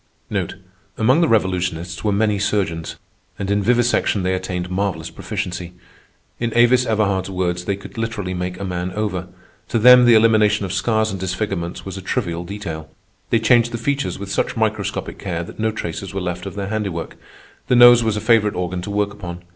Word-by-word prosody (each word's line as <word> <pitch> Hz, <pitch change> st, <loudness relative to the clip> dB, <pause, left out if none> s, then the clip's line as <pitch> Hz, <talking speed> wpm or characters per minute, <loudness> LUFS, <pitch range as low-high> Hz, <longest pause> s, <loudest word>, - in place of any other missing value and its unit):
Among 130 Hz, +9 st, +3 dB
the 165 Hz, -, +4 dB
Revolutionists 90 Hz, -, 0 dB
were 105 Hz, -, +1 dB
many 105 Hz, 0 st, +1 dB
surgeons, 95 Hz, -6 st, -1 dB, 0.4 s
and 100 Hz, 0 st, -3 dB
in 100 Hz, 0 st, +2 dB
vivisection 120 Hz, -3 st, +2 dB
they 95 Hz, 0 st, +1 dB
attained 90 Hz, -1 st, -3 dB
marvellous 90 Hz, -4 st, -2 dB
proficiency. 90 Hz, -1 st, -5 dB, 0.7 s
In 120 Hz, -1 st, -1 dB
Avis 120 Hz, +1 st, +4 dB
Everhard's 100 Hz, -4 st, 0 dB
words, 90 Hz, -1 st, -2 dB
they 100 Hz, -, 0 dB
could 100 Hz, +3 st, -10 dB
literally 115 Hz, -5 st, -3 dB
make 90 Hz, 0 st, -4 dB
a -, -, -4 dB
man 90 Hz, -1 st, -3 dB
over. 95 Hz, -4 st, -2 dB, 0.4 s
To -, -, 0 dB
them 125 Hz, +2 st, +8 dB
the 120 Hz, -1 st, +7 dB
elimination 110 Hz, -2 st, +4 dB
of 95 Hz, -, -4 dB
scars 110 Hz, +1 st, +1 dB
and 95 Hz, -, -5 dB
disfigurements 90 Hz, -2 st, -3 dB
was 95 Hz, 0 st, -6 dB
a -, -, -6 dB
trivial 85 Hz, -2 st, -2 dB
detail. 85 Hz, -5 st, -6 dB, 0.4 s
They 115 Hz, -, +3 dB
changed 120 Hz, +1 st, +3 dB
the 115 Hz, -, -3 dB
features 140 Hz, +4 st, -1 dB
with 100 Hz, 0 st, -7 dB
such -, -, -1 dB
microscopic 110 Hz, -3 st, -2 dB
care 85 Hz, -3 st, -3 dB
that 85 Hz, -, -11 dB
no 110 Hz, 0 st, +1 dB
traces 95 Hz, -2 st, -5 dB
were -, -, 0 dB
left 90 Hz, 0 st, -4 dB
of -, -, -7 dB
their 100 Hz, -1 st, -4 dB
handiwork. 100 Hz, -6 st, -3 dB, 0.5 s
The 125 Hz, -, +3 dB
nose 120 Hz, -1 st, +8 dB
was 110 Hz, -2 st, 0 dB
a -, -, -3 dB
favorite 110 Hz, -2 st, +3 dB
organ 90 Hz, 0 st, -2 dB
to 90 Hz, -, -6 dB
work 100 Hz, 0 st, 0 dB
upon. 90 Hz, -3 st, -8 dB
100 Hz, 185 wpm, -20 LUFS, 90-110 Hz, 0.7 s, them